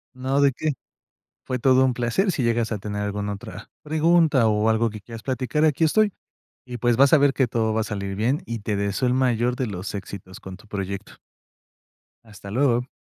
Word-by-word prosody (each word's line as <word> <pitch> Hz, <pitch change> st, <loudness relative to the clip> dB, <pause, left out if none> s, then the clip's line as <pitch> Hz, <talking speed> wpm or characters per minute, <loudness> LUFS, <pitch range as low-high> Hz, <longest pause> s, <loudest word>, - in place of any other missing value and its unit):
No, 130 Hz, +2 st, 0 dB
¿de 140 Hz, -1 st, +5 dB
qué? 155 Hz, +2 st, -1 dB, 0.7 s
Fue 130 Hz, -, -2 dB
todo 130 Hz, +1 st, +4 dB
un 130 Hz, -, +1 dB
placer 125 Hz, -, 0 dB
si 140 Hz, -, -2 dB
llegas 115 Hz, -1 st, 0 dB
a 110 Hz, -, -1 dB
tener 105 Hz, +1 st, -5 dB
alguna 105 Hz, 0 st, -3 dB
otra 100 Hz, -, -10 dB
pregunta 155 Hz, -5 st, +3 dB
o 105 Hz, +1 st, +2 dB
algo 110 Hz, +1 st, +2 dB
que 110 Hz, -1 st, -9 dB
quieras 115 Hz, +2 st, -10 dB
platicar, 130 Hz, +3 st, 0 dB
aquí 155 Hz, +1 st, +2 dB
estoy. 205 Hz, +5 st, +3 dB, 0.5 s
Y 125 Hz, -1 st, -6 dB
pues 120 Hz, 0 st, +1 dB
vas 140 Hz, 0 st, +5 dB
a -, -, +9 dB
ver 140 Hz, -1 st, +3 dB
que 130 Hz, -3 st, +1 dB
todo 110 Hz, -1 st, 0 dB
va 110 Hz, -, +1 dB
a -, -, 0 dB
salir 100 Hz, -2 st, -4 dB
bien 120 Hz, +8 st, 0 dB
y 115 Hz, -1 st, -4 dB
te 105 Hz, 0 st, -2 dB
deseo 100 Hz, +4 st, -1 dB
el 125 Hz, -, +2 dB
mayor 125 Hz, -1 st, +1 dB
de 125 Hz, -1 st, -2 dB
los 100 Hz, -1 st, -5 dB
éxitos 95 Hz, -2 st, -8 dB
con 95 Hz, -1 st, -9 dB
tu 105 Hz, -, -19 dB
proyecto. 100 Hz, -1 st, -5 dB, 1.1 s
Hasta 105 Hz, -2 st, -12 dB
luego. 125 Hz, 0 st, +1 dB
120 Hz, 205 wpm, -23 LUFS, 105-130 Hz, 1.1 s, a